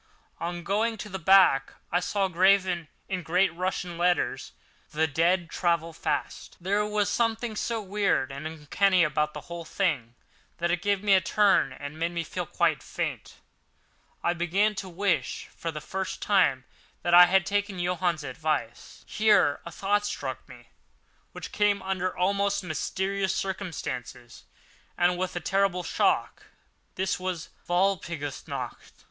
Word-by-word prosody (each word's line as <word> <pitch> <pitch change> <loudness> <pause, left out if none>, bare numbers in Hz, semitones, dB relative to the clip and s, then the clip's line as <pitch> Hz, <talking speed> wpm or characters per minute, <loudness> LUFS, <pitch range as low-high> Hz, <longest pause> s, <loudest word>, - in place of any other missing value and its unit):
On 175 0 -4
going 220 +5 0
to 210 - -7
the 190 -1 -5
back 175 -6 +5 0.2
I 175 - +3
saw, 195 +2 0
graven 185 -2 +3 0.2
in 185 -2 -2
great 180 +2 +2
Russian 180 -1 -3
letters: 175 0 +1 0.4
"The 155 +1 +1
dead 170 +4 +1
travel 170 -2 0
fast." - - -3
There 200 +4 +1
was 210 -1 0
something 230 -1 0
so 225 0 -2
weird 195 -9 0
and 140 +3 -5
uncanny 170 +4 +2
about 150 -1 0
the 150 - -5
whole 170 +2 -7
thing 145 - -1 0.4
that 170 0 0
it 175 0 0
gave 200 -1 0
me 205 -1 +4
a 190 - +6
turn 205 +5 +3
and 145 +2 -8
made 170 +1 -1
me 170 -1 -2
feel - - -5
quite - - +1
faint. - - -5 0.9
I 175 - +2
began 180 +5 +1
to 190 -1 -6
wish, 190 +2 -1
for 165 - -4
the 155 - -6
first 190 +4 -4
time, 145 -11 +2 0.4
that 175 - 0
I 175 0 +10
had 190 0 +3
taken 200 0 -1
Johann's 175 -3 0
advice. 140 -4 -4
Here 210 -9 +3
a - - -7
thought 205 +4 0
struck - - -5
me, - - -14 0.6
which - - -8
came 205 -1 +2
under 185 -1 -2
almost 200 +2 +1
mysterious 190 +4 -1
circumstances 155 - -5 0.5
and 175 +1 +3
with 185 0 -3
a - - -1
terrible 195 -1 +1
shock. - - 0 0.5
This 190 -1 -1
was 185 -3 -4 0.2
Walpurgis 175 -6 -1
Night! - - -6
180 Hz, 150 wpm, -27 LUFS, 165-195 Hz, 0.9 s, I